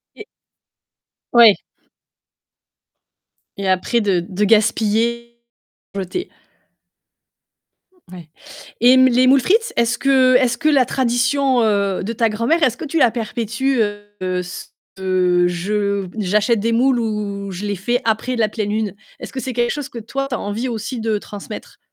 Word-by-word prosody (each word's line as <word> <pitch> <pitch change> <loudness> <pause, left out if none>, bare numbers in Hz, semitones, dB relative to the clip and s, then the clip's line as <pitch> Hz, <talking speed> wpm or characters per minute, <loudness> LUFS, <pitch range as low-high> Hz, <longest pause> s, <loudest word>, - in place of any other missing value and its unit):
Et 430 - -11 1.1
Ouais. 230 -4 +7 2.0
Et 200 -1 -3
après 190 +6 +1
de 195 -4 +1
de 195 +2 -2
gaspiller, 225 +2 +1 0.5
jeter. 195 - -4 1.8
Ouais 175 -4 -11 0.5
et 250 +2 +6
mmh, 260 0 +6
les 250 +1 +3
moules 270 +2 +5
frites, 445 - +1
est-ce 235 0 +1
que 260 -2 +3
est-ce 250 -2 +2
que 310 - +2
la 270 -4 +4
tradition, 255 +1 +1
heu, 200 -3 0
de 225 +4 -3
ta 230 0 +1
grand-mère, 230 +11 0
est-ce 250 -5 +2
que 315 - -6
tu 315 +2 -1
la 250 - +5
perpétues, 235 +3 -2
heu, 205 -3 -3
cette 180 - -9 0.3
je 185 +2 0
j'achète 210 +3 +1
des 230 +2 0
moules 245 +2 +2
ou 205 -3 -3
je 190 +3 -6
les 205 -1 -2
fais 240 +7 -1
après 230 +3 0
la 225 -2 +1
pleine 210 -1 -4
lune? 210 -2 -2 0.2
Est-ce - - -9
que 265 - -4
c'est 260 0 -5
quelque 240 0 0
chose 290 -2 -5
que 245 - -10
toi 275 +5 -4
tu 250 - -2
as - - -4
envie 210 +5 -3
aussi 235 +2 -5
de 220 -1 0
transmettre? 205 +1 -9
225 Hz, 155 wpm, -19 LUFS, 205-250 Hz, 2.0 s, Ouais